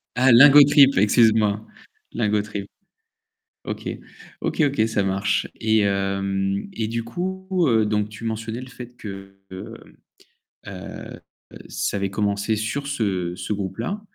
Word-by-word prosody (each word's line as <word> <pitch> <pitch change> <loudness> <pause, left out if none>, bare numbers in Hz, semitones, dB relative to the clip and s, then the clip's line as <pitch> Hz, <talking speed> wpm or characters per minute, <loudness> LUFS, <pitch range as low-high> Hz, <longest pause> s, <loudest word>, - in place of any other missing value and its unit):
Ah 130 +1 +4
Lingotrip 140 +2 +7
excuse-moi, 110 0 +3 0.5
Lingotrip. 105 -2 -1 1.0
OK. - - -5 0.5
OK, - - -1
OK, 135 -6 +1
ça 110 -3 0
marche 95 +1 0
et 110 0 +2
hem, 100 - -1
et 110 - -2
du 115 +1 -3
coup, 190 +10 -5 0.2
heu, 110 -4 +3
donc 105 0 -1
tu 105 +2 -11
mentionnais 115 +1 -4
le 130 - -10
fait 125 -1 -11
que, 95 -3 -10
heu, 95 - -8 0.9
heu, - - -8 0.7
ça - - -2
avait 100 0 -1
commencé 100 +2 -1
sur 110 +7 -3
ce 95 -10 -2
ce 105 - -4
groupe-là. 105 - -4
110 Hz, 125 wpm, -22 LUFS, 100-120 Hz, 1.0 s, Lingotrip